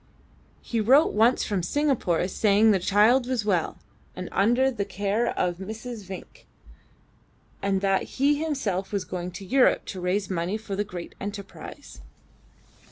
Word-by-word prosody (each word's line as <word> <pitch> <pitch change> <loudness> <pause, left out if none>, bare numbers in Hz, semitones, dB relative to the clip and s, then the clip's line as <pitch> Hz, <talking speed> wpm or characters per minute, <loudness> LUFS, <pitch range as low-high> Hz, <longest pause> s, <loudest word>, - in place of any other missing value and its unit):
He 230 -2 -1
wrote 270 +9 +5
once 225 +4 +3
from 200 -3 -1
Singapore 220 - 0
saying 210 +2 +3
the 195 - +3
child 215 +7 +4
was 250 -5 -1
well, 180 -6 0 0.4
and 185 0 -6
under 240 +7 +3
the 215 -5 -2
care 205 +4 -1
of 180 0 -1
a - - -4
Mrs. 220 +1 -7
Vinck, 190 -1 -10 1.1
and 195 -1 0
that 195 -1 +2
he 285 +2 +2
himself 210 - -2
was 200 -3 -2
going 180 -1 -4
to 185 +2 -9
Europe 255 +5 +3
to 185 - -6
raise 185 +2 0
money 185 +2 -2
for 215 -3 -6
the 205 - 0
great 180 -4 -8
enterprise. 200 - -8
205 Hz, 155 wpm, -26 LUFS, 190-235 Hz, 1.1 s, wrote